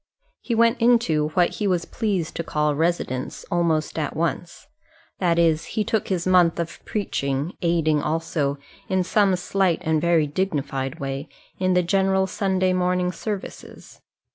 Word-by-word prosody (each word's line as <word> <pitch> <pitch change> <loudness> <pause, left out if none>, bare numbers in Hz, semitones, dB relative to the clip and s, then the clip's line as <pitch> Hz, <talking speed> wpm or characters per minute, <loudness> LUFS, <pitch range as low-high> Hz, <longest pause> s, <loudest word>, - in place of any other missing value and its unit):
He 235 - -2
went 230 0 +3
into, 230 -11 +3
what 175 -1 +2
he 210 - 0
was 180 -3 0
pleased 195 -8 -2
to 170 - -2
call 150 -1 0
residence, 150 -5 -2
almost 165 -2 0
at 150 - -3
once. 170 +2 -3 0.5
That 170 -3 +2
is, 165 -2 +2
he 215 - +3
took 215 0 -1
his 180 -3 -1
month 180 -2 +4
of 170 0 -5
preaching, 140 -6 -2
aiding 160 -3 +2
also 155 -3 -1 0.3
in 190 -1 +2
some 195 0 +3
slight 180 -1 +1
and 160 -1 +1
very 170 -2 +3
dignified 145 -3 -2
way, 135 +1 -4 0.3
in 185 -1 +2
the 180 - +3
general 190 +1 +2
Sunday 190 -1 0
morning 180 0 +1
services. 200 +2 -7
175 Hz, 150 wpm, -23 LUFS, 155-190 Hz, 0.5 s, month